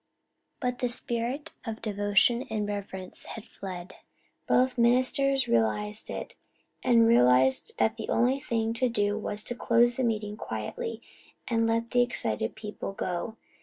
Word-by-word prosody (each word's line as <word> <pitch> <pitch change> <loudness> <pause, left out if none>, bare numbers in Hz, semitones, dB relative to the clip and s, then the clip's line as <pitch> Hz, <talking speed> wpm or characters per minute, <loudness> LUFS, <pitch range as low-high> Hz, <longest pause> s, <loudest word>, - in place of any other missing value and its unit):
But 250 -1 -2
the 250 - 0
spirit 240 +5 -2
of 225 -2 -5
devotion 210 +4 +2
and 210 -2 -1
reverence 195 -2 -5
had 225 -1 -8
fled. 185 -4 -8 0.5
Both 255 0 +3
ministers 255 +3 +3
realized 210 - 0
it - - -5 0.5
and 235 -2 +5
realized 130 - +4
that 220 +1 +2
the 220 - -6
only 255 +3 +2
thing 225 -3 -1
to 250 +2 +1
do 205 -2 +1
was 210 0 -4
to - - -2
close 240 0 +3
the 260 - 0
meeting 210 -3 -1
quietly 220 - -5 0.4
and 230 -1 +2
let 230 +1 0
the 245 - +4
excited 110 - -1
people 210 -2 -6
go. 185 +4 -3
225 Hz, 145 wpm, -28 LUFS, 205-240 Hz, 0.5 s, and